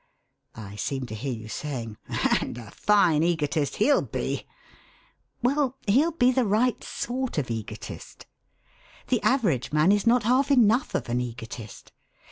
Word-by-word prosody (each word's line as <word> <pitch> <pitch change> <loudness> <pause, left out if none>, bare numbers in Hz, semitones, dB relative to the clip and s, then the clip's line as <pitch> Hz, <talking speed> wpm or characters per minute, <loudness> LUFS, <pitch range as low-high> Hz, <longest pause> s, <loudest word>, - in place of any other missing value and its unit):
I 105 -2 -9
seem 135 +3 -3
to 120 - -8
hear 130 +5 -4
you 110 -2 -6
saying: 115 -3 -5
'And - - 0
a 110 -4 -10
fine 180 -7 +3
egotist 155 -4 0
he'll 280 +7 +3
be!' - - -4 1.0
Well, 270 0 +1
he'll 270 +11 +4
be 255 -5 +4
the 260 0 +2
right 225 +4 +1
sort 255 -2 -3
of 130 -5 -1
egotist. 110 -1 -7 0.8
The - - +2
average 195 - +1
man 155 +5 +4
is 205 +2 +1
not 240 0 +4
half 255 +5 +2
enough 245 -2 +3
of - - -2
an 120 +1 0
egotist. 115 -2 -8
165 Hz, 145 wpm, -26 LUFS, -, 1.0 s, he'll